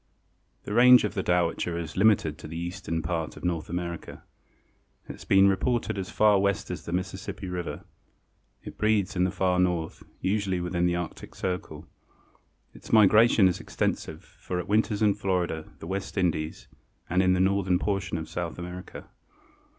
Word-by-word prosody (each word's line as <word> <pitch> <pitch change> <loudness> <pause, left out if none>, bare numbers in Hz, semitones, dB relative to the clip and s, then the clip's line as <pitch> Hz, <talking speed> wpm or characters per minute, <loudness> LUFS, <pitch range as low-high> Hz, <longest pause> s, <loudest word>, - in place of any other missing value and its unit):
_) - - -42
The 105 - -5
range 125 +2 +7
of 105 - -2
the 100 - -1
Dowitcher 85 -1 0
is 85 -2 -6
limited 95 -7 +3
to - - -9
the 80 +1 -7
eastern 85 -1 -4
part 80 -3 -3
of - - -12
North 85 -3 -2
America. 85 -1 -5 0.8
It - - -6
has - - -12
been 95 0 +5
reported 100 +2 0
as 95 - -5
far 105 -2 +4
west 100 -1 0
as - - -6
the - - -6
Mississippi 95 +2 -4
river. 90 -1 -5 0.8
It - - -10
breeds 110 -4 +1
in 90 0 +2
the - - +1
far 90 -1 +1
north, 90 -3 -1 0.2
usually 95 -2 0
within 90 0 0
the 85 - 0
Arctic 85 -1 -6
Circle. 90 -1 -4 0.9
Its - - -12
migration 110 -1 +6
is 90 - -1
extensive 80 0 -3
for 90 - -7
it 90 - -4
winters 105 0 +1
in 105 -1 +4
Florida, 90 -5 -2
the - - -10
West 95 +4 -5
Indies 80 -4 -1 0.4
and 90 +2 +2
in 90 -1 +3
the 90 - +1
northern 95 -1 +2
portion 95 -3 -2
of 80 -1 -5
South 85 +1 -5
America. 90 +1 -8
90 Hz, 175 wpm, -27 LUFS, 85-100 Hz, 0.9 s, range